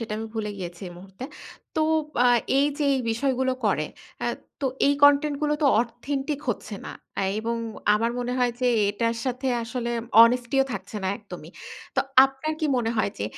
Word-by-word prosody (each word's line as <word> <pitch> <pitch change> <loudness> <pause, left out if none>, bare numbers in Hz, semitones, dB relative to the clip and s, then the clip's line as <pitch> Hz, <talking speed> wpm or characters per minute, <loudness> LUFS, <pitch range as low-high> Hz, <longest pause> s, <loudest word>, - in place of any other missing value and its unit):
সেটা, 225 -2 -5
আমি 225 - -4
ভুলে 215 -1 -2
গিয়েছি 175 -2 -7
এই - - -10
মুহূর্তে। 190 +5 -10 0.5
তো - - +2 0.4
বা 245 - +4 0.3
এইযে 290 +1 +1
এই 265 - 0
বিষয়গুলো 260 +2 0
করে। - - +1 0.4
আ - - 0 0.3
তো 275 - 0 0.2
এই 285 - +4
content 285 +1 +5
গুলো 300 0 +2
তো - - +5
authentic 270 +5 -2
হচ্ছে 215 -1 -3
না। - - -6 0.5
এবং 230 +1 -2 0.4
আমার 230 +2 +1
মনে 245 0 -2
হয় 245 -1 +3
যে, 250 - +2 0.2
এটার 230 +3 -1
সাথে 255 +1 -2 0.2
আসলে 235 +1 -3 0.3
honesty 240 +2 +4
ও - - -2
থাকছে 195 +2 -6
না 190 - 0
একদমই। 180 -6 -10 0.4
তো, - - +3 0.2
আপনার 270 +3 -3
কি 310 - +1
মনে 230 -2 0
হয় 215 - +1
যে, 100 - -2
245 Hz, 180 wpm, -25 LUFS, 220-270 Hz, 0.5 s, content